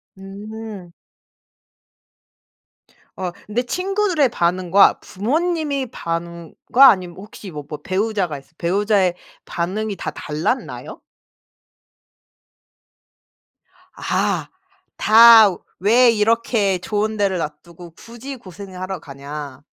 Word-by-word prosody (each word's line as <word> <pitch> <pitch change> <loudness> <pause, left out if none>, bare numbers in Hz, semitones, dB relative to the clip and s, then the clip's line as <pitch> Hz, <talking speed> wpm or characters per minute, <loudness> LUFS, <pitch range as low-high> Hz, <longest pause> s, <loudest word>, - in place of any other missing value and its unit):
음. 200 -1 -9 2.2
어 185 -2 -4 0.2
근데 225 +4 -1
친구들의 365 -1 0
반응과 185 -1 +3
부모님의 290 - -2
반응과 170 - +2
아니면 180 -5 0
혹시 210 0 -11
뭐 150 -2 -7
뭐 150 -1 -7
배우자가 190 -3 -1
있어 135 - -24
배우자의 195 0 +1 0.3
반응이 200 +5 -3
다 - - -4
달랐나요? 155 - -4 3.0
아. - - -1 0.5
다 220 -2 +8 0.2
"왜 235 +6 +5
이렇게 220 -3 +1
좋은 215 +3 -2
데를 200 -3 +1
놔 165 -3 -2
두고 170 0 -14
굳이 235 +9 -10
고생을 190 -4 -11
하러 185 -1 -4
가냐?" 140 -1 -9
200 Hz, 195 characters per minute, -20 LUFS, 175-230 Hz, 3.0 s, 다